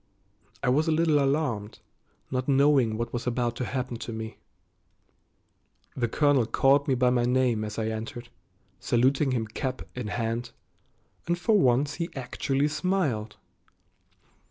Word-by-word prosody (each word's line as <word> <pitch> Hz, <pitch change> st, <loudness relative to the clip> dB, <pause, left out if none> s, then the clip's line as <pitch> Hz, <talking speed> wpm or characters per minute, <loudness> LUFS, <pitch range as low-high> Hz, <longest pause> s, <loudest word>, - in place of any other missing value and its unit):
I -, -, +2 dB
was 150 Hz, +6 st, +2 dB
a -, -, +3 dB
little 155 Hz, -1 st, +3 dB
alarmed, 135 Hz, -7 st, -1 dB, 0.5 s
not 130 Hz, 0 st, -2 dB
knowing 135 Hz, -5 st, +3 dB
what 115 Hz, +1 st, -4 dB
was 120 Hz, +1 st, -3 dB
about 120 Hz, -1 st, 0 dB
to 125 Hz, -, -2 dB
happen 125 Hz, -2 st, -3 dB
to 115 Hz, -, -6 dB
me. 110 Hz, 0 st, -6 dB, 1.6 s
The 120 Hz, -2 st, 0 dB
colonel 140 Hz, -1 st, +2 dB
called 135 Hz, +3 st, +3 dB
me 135 Hz, -, +2 dB
by 125 Hz, 0 st, +3 dB
name 125 Hz, -2 st, +2 dB
as 105 Hz, -1 st, -5 dB
I 110 Hz, -1 st, -1 dB
entered, 115 Hz, +2 st, -6 dB, 0.5 s
saluting 135 Hz, +4 st, +2 dB
him 120 Hz, -4 st, 0 dB
cap 130 Hz, +4 st, -4 dB
in 125 Hz, -3 st, -5 dB
hand, 115 Hz, +2 st, -3 dB, 0.7 s
and 175 Hz, 0 st, +1 dB
for 215 Hz, +5 st, +2 dB
once 135 Hz, 0 st, +2 dB
he 170 Hz, -, -2 dB
actually 135 Hz, +2 st, -1 dB
smiled. 150 Hz, -, -1 dB
125 Hz, 140 wpm, -27 LUFS, 115-140 Hz, 1.6 s, a